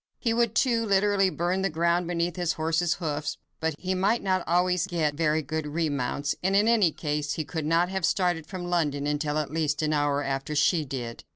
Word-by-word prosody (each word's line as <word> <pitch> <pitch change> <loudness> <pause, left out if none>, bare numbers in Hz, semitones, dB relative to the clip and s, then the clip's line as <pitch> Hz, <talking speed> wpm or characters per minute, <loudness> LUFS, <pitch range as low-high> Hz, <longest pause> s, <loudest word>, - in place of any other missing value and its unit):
He 230 - 0
would, 235 -1 +1
too, 235 -3 +2
literally 200 -1 +3
burn 180 +2 -1
the 195 - +1
ground 170 +2 +1
beneath 170 -1 -1
his 175 -2 0
horse's 165 +2 0
hoofs, 150 -3 -3 0.2
but 160 -1 -1
he 185 0 -2
might 200 +5 +1
not 185 -2 +1
always 180 +1 +2
get 165 -5 0
very 155 0 +1
good 155 +1 -3
remounts, 145 -3 -1
and 190 +2 +1
in 205 +2 +4
any 215 -8 +4
case, 150 -1 -2
he 160 - -3
could 160 -2 -4
not 165 +2 +3
have 190 -1 -3
started 175 -3 +1
from 180 +1 -6
London 150 -5 0
until 150 0 -1
at 150 -2 -2
least 155 -2 -1
an 155 0 +1
hour 145 -1 +1
after 135 +2 -3
she 155 +2 +2
did. 120 -4 -6
165 Hz, 205 wpm, -27 LUFS, 150-185 Hz, 0.2 s, in